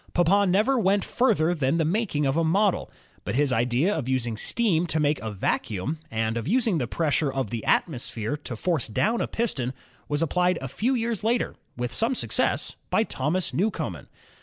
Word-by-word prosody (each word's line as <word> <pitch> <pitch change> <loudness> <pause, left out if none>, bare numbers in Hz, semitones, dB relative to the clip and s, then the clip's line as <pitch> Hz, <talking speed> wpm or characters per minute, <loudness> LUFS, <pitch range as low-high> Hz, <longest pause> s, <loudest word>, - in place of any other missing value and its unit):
Papin 190 +3 +4
never 220 +8 +3
went 200 -1 +2
further 195 -10 +2
than 145 -1 +1
the 165 - +2
making 170 -4 0
of 135 0 +1
a 165 - +2
model. 190 +4 +2 0.3
But - - -3
his 140 -1 +2
idea 125 - +2
of 130 -5 -3
using 120 -3 0
steam 175 - +1
to 160 - 0
make 150 0 +1
a 110 - -4
vacuimi, 105 - -2
and 110 -1 -1
of 115 - -4
using 225 -4 +2
the 125 - -1
pressure 150 0 0
of 130 -5 -3
the 115 -2 -3
atmosphere 120 -4 0
to 135 -4 -7
force 165 +3 -1
down 220 - +1
a - - 0
piston 135 - -2 0.4
was 145 +2 +1
applied 180 +2 +1
a 135 - -5
few 235 - 0
years 230 -3 -2
later 235 +2 +1 0.2
with 125 0 -3
some 235 +4 +1
success - - +1
by 220 - +3
Thomas 170 0 -2
Newcomen. 210 +4 -2
160 Hz, 185 wpm, -25 LUFS, 130-205 Hz, 0.4 s, Papin